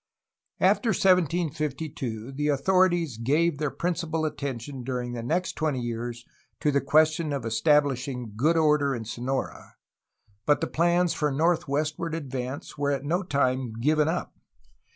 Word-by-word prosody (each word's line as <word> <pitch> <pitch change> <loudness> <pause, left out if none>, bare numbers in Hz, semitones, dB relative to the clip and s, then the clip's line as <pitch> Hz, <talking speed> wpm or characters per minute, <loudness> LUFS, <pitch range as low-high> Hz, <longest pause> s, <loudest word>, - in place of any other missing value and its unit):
After 235 - +3
1752 155 - 0
the 150 +2 -2
authorities 170 - +2
gave 145 +6 +1
their 150 -2 0
principal 165 -1 -2
attention, 135 -3 -4
during 125 -1 -3
the 120 - -4
next 170 +10 -1
twenty 155 -5 -1
years, 120 0 -4 0.3
to 150 - +2
the 140 0 +2
question 155 0 +3
of 140 -4 -3
establishing 130 -2 +1
good 155 +9 +2
order 150 -3 +3
in 115 -2 -6
Sonora, 125 +5 -4 0.7
but 145 - +4
the - - 0
plans 175 +1 +2
for 150 -1 0
northwestward 155 +1 0
ad 145 -5 -6
vance 130 +2 -5
were 145 0 +1
at 140 0 -1
no 175 +6 +1
time 130 - 0
given 150 +4 +2
up. 170 +2 -2
145 Hz, 140 wpm, -26 LUFS, 130-160 Hz, 0.7 s, but